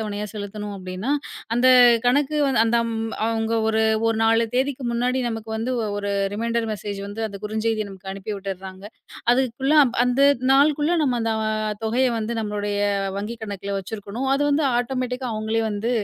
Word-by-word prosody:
தவணையா 210 Hz, -1 st, -3 dB
செலுத்தணும் 205 Hz, 0 st, -6 dB
அப்படின்னா 185 Hz, +7 st, -4 dB, 0.5 s
அந்த 250 Hz, +1 st, +3 dB, 0.4 s
கணக்கு 290 Hz, +4 st, +2 dB
வந்து 260 Hz, -5 st, +3 dB
அந்த 235 Hz, +1 st, +2 dB
ம் 225 Hz, 0 st, -3 dB
அவங்க 225 Hz, 0 st, -1 dB, 0.2 s
ஒரு 220 Hz, 0 st, +2 dB, 0.3 s
ஒரு 225 Hz, -, +1 dB
நாலு 225 Hz, +1 st, +3 dB
தேதிக்கு 270 Hz, 0 st, 0 dB
முன்னாடி 250 Hz, +2 st, 0 dB
நமக்கு 225 Hz, -1 st, -5 dB
வந்து 230 Hz, +3 st, -2 dB
ஒ -, -, -1 dB
ஒரு 200 Hz, 0 st, -2 dB, 0.2 s
ரீமைண்டர் 230 Hz, +1 st, -1 dB
மெஸேஜ் 205 Hz, -1 st, -5 dB
வந்து 205 Hz, +2 st, -6 dB
அந்த 200 Hz, -, -8 dB
குறுஞ்செய்தி 215 Hz, 0 st, -1 dB
நமக்கு 190 Hz, 0 st, -9 dB
அனுப்பி 195 Hz, +2 st, -5 dB
விட்டர்றாங்க. 190 Hz, 0 st, -7 dB, 0.5 s
அதுக்குள்ள 265 Hz, +3 st, +1 dB, 0.3 s
அந்த 250 Hz, +2 st, +1 dB, 0.3 s
நாளுக்குள்ள 295 Hz, +3 st, +3 dB
நம்ம 245 Hz, -3 st, 0 dB
அந்த 225 Hz, 0 st, 0 dB, 0.5 s
தொகைய 245 Hz, +4 st, +2 dB
வந்து 220 Hz, +1 st, -3 dB
நம்மளுடைய 205 Hz, -1 st, -2 dB, 0.4 s
வங்கி 220 Hz, +3 st, -4 dB
கணக்குல 200 Hz, -1 st, -4 dB
வச்சிருக்கணும். 215 Hz, +6 st, -5 dB
அது 280 Hz, -, +1 dB
வந்து 290 Hz, +1 st, +2 dB
ஆட்டோமேட்டிக்கா 255 Hz, +1 st, -2 dB
அவங்களே 220 Hz, +1 st, -1 dB
வந்து 210 Hz, +3 st, -2 dB
225 Hz, 155 wpm, -23 LUFS, 205-250 Hz, 0.5 s, அந்த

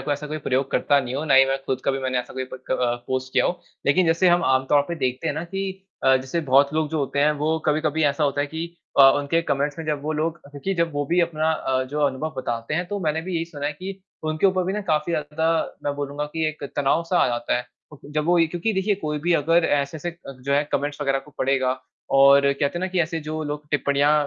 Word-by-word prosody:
को 145 Hz, -, -1 dB
ऐसा 145 Hz, +1 st, -4 dB
कोई 155 Hz, +1 st, -4 dB
प्रयोग 135 Hz, -1 st, -1 dB
करता 145 Hz, -, +3 dB
नहीं 130 Hz, -1 st, -5 dB
हूँ, 145 Hz, -, -2 dB
ना 135 Hz, -, +4 dB
ही 135 Hz, -, +8 dB
मैं 135 Hz, 0 st, +1 dB
ख़ुद 135 Hz, -1 st, -3 dB
कभी 135 Hz, 0 st, +1 dB
मैंने 130 Hz, -1 st, -1 dB
ऐसा 125 Hz, -, -5 dB
कोई 130 Hz, -, -3 dB
प 130 Hz, -, -6 dB
क -, -, +3 dB
अ, 120 Hz, -1 st, +2 dB
पोस्ट 130 Hz, 0 st, -3 dB
किया -, -, +3 dB
हो। 175 Hz, -, -2 dB, 0.3 s
लेक़िन 170 Hz, +5 st, +4 dB
जैसे 170 Hz, +3 st, +4 dB
हम 175 Hz, 0 st, +3 dB
आम 130 Hz, 0 st, +3 dB
तौर 145 Hz, -1 st, +5 dB
पे 170 Hz, -, -2 dB
देखते 130 Hz, 0 st, -2 dB
हैं 145 Hz, -, -1 dB
ना 160 Hz, -, -3 dB
कि 195 Hz, +1 st, -5 dB, 0.2 s
अ, 130 Hz, 0 st, +6 dB
जैसे 130 Hz, +6 st, -2 dB
बहुत 140 Hz, 0 st, +3 dB
लोग 155 Hz, -1 st, +1 dB
जो 160 Hz, -, -1 dB
होते 140 Hz, 0 st, -2 dB
हैं 150 Hz, +1 st, +4 dB
वो 155 Hz, +2 st, +1 dB
कभी-कभी 155 Hz, +1 st, +1 dB
ऐसा 145 Hz, +1 st, +2 dB
होता 145 Hz, 0 st, 0 dB
है 145 Hz, -, 0 dB
कि 160 Hz, +3 st, -4 dB, 0.3 s
अ, -, -, +10 dB, 0.2 s
उनके 155 Hz, +4 st, 0 dB
कमेंट्स 145 Hz, +1 st, -1 dB
में 160 Hz, -, -5 dB
जब 150 Hz, -2 st, -1 dB
वो 155 Hz, +1 st, -2 dB
लोग 160 Hz, +2 st, -1 dB
क्योंकि 145 Hz, +7 st, -3 dB
जब 170 Hz, -2 st, 0 dB
वो 145 Hz, 0 st, -1 dB
भी 175 Hz, +3 st, +2 dB
अपना 160 Hz, -2 st, +1 dB
अ, 130 Hz, -4 st, 0 dB
जो 145 Hz, +3 st, -4 dB
अनुभव 145 Hz, +4 st, -3 dB
बताते 120 Hz, +1 st, -3 dB
हैं, 175 Hz, +3 st, -1 dB
तो 205 Hz, 0 st, -2 dB
मैंने 160 Hz, -2 st, 0 dB
भी 185 Hz, +1 st, -5 dB
यही 165 Hz, -, -1 dB
सुना 145 Hz, -4 st, -5 dB
है 150 Hz, -, -1 dB
कि 190 Hz, +5 st, -8 dB, 0.2 s
उनके 155 Hz, +5 st, +2 dB
ऊपर 185 Hz, -1 st, +1 dB
भी 190 Hz, -, -1 dB
ना 210 Hz, -, -2 dB
काफ़ी 155 Hz, +3 st, 0 dB
ज़्यादा 160 Hz, +1 st, -1 dB
मैं 145 Hz, -, -1 dB
बोलूँगा 145 Hz, +1 st, -3 dB
कि 160 Hz, -1 st, 0 dB
एक 155 Hz, -1 st, -8 dB
तनाव-सा 165 Hz, +5 st, +1 dB
आ -, -, +4 dB
जाता 120 Hz, 0 st, 0 dB
है 125 Hz, -, -4 dB, 0.3 s
और 150 Hz, -, -12 dB
फिर 145 Hz, -, -14 dB
जब 150 Hz, 0 st, 0 dB
वो 175 Hz, -, +4 dB
क्योंकि 175 Hz, +6 st, -1 dB
देखिए 195 Hz, +1 st, +1 dB
कोई 150 Hz, -6 st, -3 dB
भी 175 Hz, +3 st, +1 dB
अगर 165 Hz, +3 st, +3 dB
ऐसे 145 Hz, +1 st, 0 dB
से 175 Hz, +4 st, -3 dB
अ, 170 Hz, -5 st, -11 dB
जो 140 Hz, +2 st, -2 dB
है 145 Hz, -, +2 dB
कमेंट्स 145 Hz, +1 st, -1 dB
वग़ैरह 135 Hz, -1 st, +1 dB
को 135 Hz, +2 st, -13 dB
पढ़ेगा 130 Hz, -1 st, +1 dB, 0.4 s
और 140 Hz, +1 st, +8 dB
कहते 140 Hz, +1 st, 0 dB
हैं -, -, -5 dB
ना 185 Hz, -, 0 dB
कि 185 Hz, -1 st, 0 dB
ऐसे 165 Hz, 0 st, -1 dB
जो 155 Hz, +1 st, -4 dB
लोग 150 Hz, 0 st, -5 dB
टिप्पणियाँ 145 Hz, 0 st, +2 dB
150 Hz, 270 wpm, -23 LUFS, 140-165 Hz, 0.4 s, अ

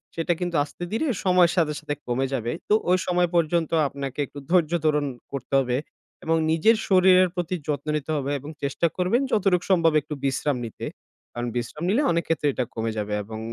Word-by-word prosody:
সেটা 165 Hz, +1 st, +1 dB
কিন্তু 175 Hz, -2 st, -2 dB
আস্তে 150 Hz, +4 st, -9 dB
ধীরে 230 Hz, +9 st, 0 dB, 0.2 s
সময়ের 180 Hz, -2 st, +4 dB
সাথে, 160 Hz, -4 st, +2 dB
সাথে 145 Hz, -, -4 dB
কমে 125 Hz, +2 st, 0 dB
যাবে। 120 Hz, -3 st, -1 dB, 0.2 s
তো -, -, +4 dB, 0.2 s
ওই 185 Hz, -, +5 dB
সময় 180 Hz, 0 st, +2 dB
পর্যন্ত 170 Hz, 0 st, +2 dB, 0.2 s
আপনাকে 140 Hz, 0 st, -6 dB
একটু 145 Hz, -, -10 dB
ধৈর্য্য 170 Hz, -2 st, +3 dB
ধারণ 150 Hz, -1 st, +2 dB, 0.3 s
করতে 140 Hz, -1 st, -6 dB
হবে 125 Hz, -2 st, 0 dB, 0.5 s
এবং 165 Hz, 0 st, +1 dB, 0.2 s
নিজের 175 Hz, +9 st, +4 dB
শরীরের 185 Hz, -1 st, +5 dB
প্রতি 175 Hz, 0 st, -2 dB
যত্ন 145 Hz, -1 st, -2 dB
নিতে 150 Hz, +1 st, -5 dB
হবে 140 Hz, 0 st, -2 dB
এবং 145 Hz, +3 st, -9 dB
চেষ্টা 140 Hz, +4 st, +1 dB
করবেন 185 Hz, +8 st, +2 dB
যতটুকু 185 Hz, -4 st, +2 dB
সম্ভব 165 Hz, -3 st, +4 dB
একটু 150 Hz, -, -7 dB
বিশ্রাম 140 Hz, 0 st, 0 dB
নিতে। 110 Hz, -, -8 dB, 0.5 s
কারণ 120 Hz, 0 st, -3 dB
বিশ্রাম 120 Hz, +6 st, -4 dB
নিলে 225 Hz, +9 st, +3 dB
অনেক 170 Hz, 0 st, +1 dB
ক্ষেত্রে 160 Hz, -2 st, 0 dB
এটা 125 Hz, -, -1 dB
কমে 115 Hz, 0 st, -1 dB
যাবে 105 Hz, 0 st, -2 dB
এবং 110 Hz, +1 st, -7 dB
160 Hz, 190 wpm, -24 LUFS, 135-180 Hz, 0.5 s, ওই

